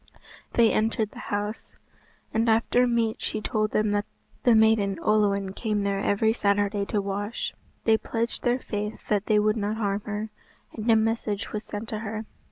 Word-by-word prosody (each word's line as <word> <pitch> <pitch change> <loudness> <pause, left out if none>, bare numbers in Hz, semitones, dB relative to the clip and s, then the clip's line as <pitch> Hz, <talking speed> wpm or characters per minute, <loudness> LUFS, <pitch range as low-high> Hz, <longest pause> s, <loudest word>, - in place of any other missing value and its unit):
They 230 -1 +5
entered 220 -1 0
the - - -11
house, 205 +1 -3 0.6
and 225 +1 +2
after 230 +2 +3
meat 230 -2 +1
she 215 - -2
told 215 0 0
them 215 0 +1
that 205 0 0 0.3
the 240 -2 +5
maiden 220 -3 +4
Olwen 200 -1 +2
came 210 -1 -1
there 200 -1 0
every 210 +3 +2
Saturday 205 -2 +1
to 210 - 0
wash. 205 +3 -3 0.3
They 220 -1 +4
pledged 230 +1 -2
their 245 0 +2
faith 210 -4 -5
that 210 -1 +1
they 215 - +4
would 210 +1 +2
not 210 +1 -1
harm 205 -2 0
her, 210 +1 -3 0.4
and 220 +2 -3
a 225 - +7
message 220 -2 0
was 215 0 -3
sent 210 +1 -6
to 215 - -3
her. 220 0 -4
215 Hz, 175 wpm, -26 LUFS, 205-225 Hz, 0.6 s, a